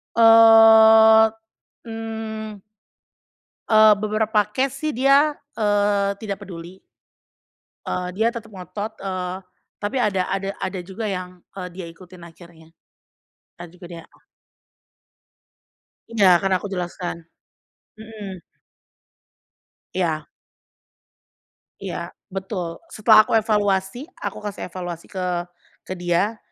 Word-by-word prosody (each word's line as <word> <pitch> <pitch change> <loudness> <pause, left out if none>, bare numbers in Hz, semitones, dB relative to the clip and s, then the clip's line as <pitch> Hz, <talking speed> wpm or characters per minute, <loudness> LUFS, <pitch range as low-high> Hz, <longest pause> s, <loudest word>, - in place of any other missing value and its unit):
Eee, 225 -1 +7 0.5
mmm 220 -2 -6 1.1
Eee, 215 -1 +7
beberapa 215 +1 0
case 265 +3 -1
sih 310 +1 -3
dia, 275 +4 +4 0.2
eee, 205 -2 +1
tidak 200 -3 -6
peduli. 175 +1 -10 1.1
Eee, 180 0 -3
dia 220 +2 +2
tetep 230 -2 -8
ngotot, 205 +3 -7
eee, 185 -1 -4 0.5
tapi 255 +6 -1
ada 195 -5 +1
ada 195 0 -3
ada 185 -1 -3
juga 190 +5 -8
yang, 180 -2 -6 0.2
eee, 180 - -5
dia 185 -2 -7
ikutin 180 0 -15
akhirnya, 165 -1 -16 0.8
entar 175 0 -11
juga 180 +1 -14
dia 165 - -9
ah. - - -28 1.9
Iya, 215 -3 +2 0.2
kan 195 0 -1
aku 195 - -3
jelaskan, 175 -1 -4 0.8
mhm. 210 -4 -9 1.6
Iya. 160 -4 -1 1.6
Iya, - - -6 0.2
betul, 190 -3 -5 0.2
setelah 215 0 +6
aku - - -4
evaluasi, 210 +2 0 0.2
aku - - -4
kasih 200 -2 -6
evaluasi 175 -2 -7
ke 185 -1 -4 0.6
ke 185 - -6
dia, 175 +5 0
205 Hz, 105 wpm, -22 LUFS, 180-220 Hz, 1.9 s, Eee